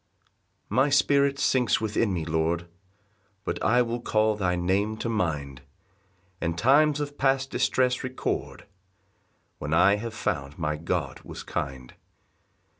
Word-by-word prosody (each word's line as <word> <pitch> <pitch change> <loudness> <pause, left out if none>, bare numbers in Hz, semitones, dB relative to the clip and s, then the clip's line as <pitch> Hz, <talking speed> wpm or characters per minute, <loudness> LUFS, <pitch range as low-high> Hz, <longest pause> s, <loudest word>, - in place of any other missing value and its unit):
1 - - -4
My 135 +3 +4
spirit 140 0 +3
sinks 125 -4 +2
within 110 0 0
me, 85 -4 -2
Lord, 80 +1 -1 0.8
But - - -3
I 125 +3 +4
will 120 0 -3
call 110 -2 +2
thy 95 -3 0
name 95 +5 0
to 115 - -3
mind, 75 - -2 0.8
And 85 0 -1
times 145 - +4
of 145 0 -5
past 135 0 +1
distress 125 -1 +1
record, 130 0 -4 0.9
When 75 +3 -1
I 95 +4 +5
have 115 +1 -6
found 70 -9 -3
my 75 -2 -1
God 80 -3 -3
was - - -9
kind. 65 -2 -5
105 Hz, 135 wpm, -26 LUFS, 80-130 Hz, 0.9 s, I